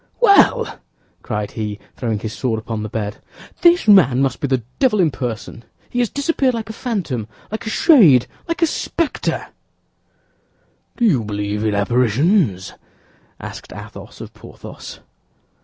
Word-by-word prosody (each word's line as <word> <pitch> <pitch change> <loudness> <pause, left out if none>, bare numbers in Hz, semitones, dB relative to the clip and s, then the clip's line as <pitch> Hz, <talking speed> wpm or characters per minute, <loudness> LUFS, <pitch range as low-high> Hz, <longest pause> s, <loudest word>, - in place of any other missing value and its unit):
"Well!" 470 +1 +4 0.4
cried 105 -3 -4
he, 105 -2 -4 0.2
throwing 115 -4 -2
his 110 +1 -5
sword 120 -3 -1
upon 110 0 -5
the 110 - -5
bed, 105 -2 -4 0.4
"this 345 -6 +4
man 155 -12 +6
must 135 -2 0
be 145 - -1
the 130 -3 0 0.2
devil 245 -6 +3
in 165 -5 +3
person; 120 -2 -5 0.3
he 245 - -1
has 240 -3 +1
disappeared 280 -3 0
like 220 -1 -5
a - - -9
phantom, 180 - -3 0.2
like 220 +1 -5
a - - 0
shade, 200 - +6 0.2
like 335 0 -1
a - - +7
specter." 330 0 -2 1.5
"Do 240 - +2
you 140 - +3
believe 105 0 -3
in 110 -2 0
apparitions?" 120 - +1 0.7
asked - - -9
Athos - - -10
of - - -9
Porthos. - - -11
130 Hz, 145 wpm, -19 LUFS, -, 1.5 s, a